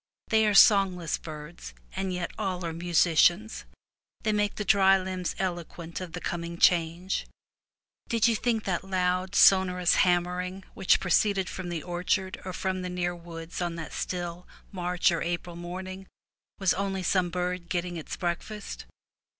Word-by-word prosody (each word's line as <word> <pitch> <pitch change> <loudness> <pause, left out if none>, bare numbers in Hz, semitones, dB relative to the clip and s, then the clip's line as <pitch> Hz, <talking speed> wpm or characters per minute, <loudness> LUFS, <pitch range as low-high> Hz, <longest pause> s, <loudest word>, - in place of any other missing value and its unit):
They 220 -1 +4
are 210 - +2
songless 190 -6 +5
birds, 150 - -9 0.2
and 190 -1 -2
yet 180 -1 -3
all 185 -2 -3
are 165 - -3
musicians; 175 +4 +2 0.6
they 215 - +2
make 205 -1 0
the 210 - -4
dry 195 -1 +5
limbs 185 -1 -3
eloquent 175 -2 -4
of 180 -3 -7
the 180 - -4
coming 170 0 -4
change. 170 +2 +2 0.8
Did 230 -1 +3
you 230 - +3
think 225 -1 0
that 180 -2 -1
loud, 185 0 -1
sonorous 180 -2 +5
ham 175 -1 +4
mering 180 +2 -5
which 190 - +3
proceeded 195 0 +2
from 185 -2 -6
the 170 -3 -4
orchard 185 +2 -1
or 185 - -5
from 185 0 -2
the 180 - -4
near 175 0 -2
woods 170 0 -8
on 175 -1 -2
that 160 -2 -7
still 175 -1 -4 0.2
March 180 -1 +1
or 170 - -1
April 175 0 -3
morning 185 +2 -7 0.5
was 190 -3 +2
only 195 -1 -2
some 180 0 +2
bird 180 0 -3
getting 175 0 -2
its 160 - -6
breakfast? 190 +4 -4
180 Hz, 160 wpm, -28 LUFS, 175-190 Hz, 0.8 s, songless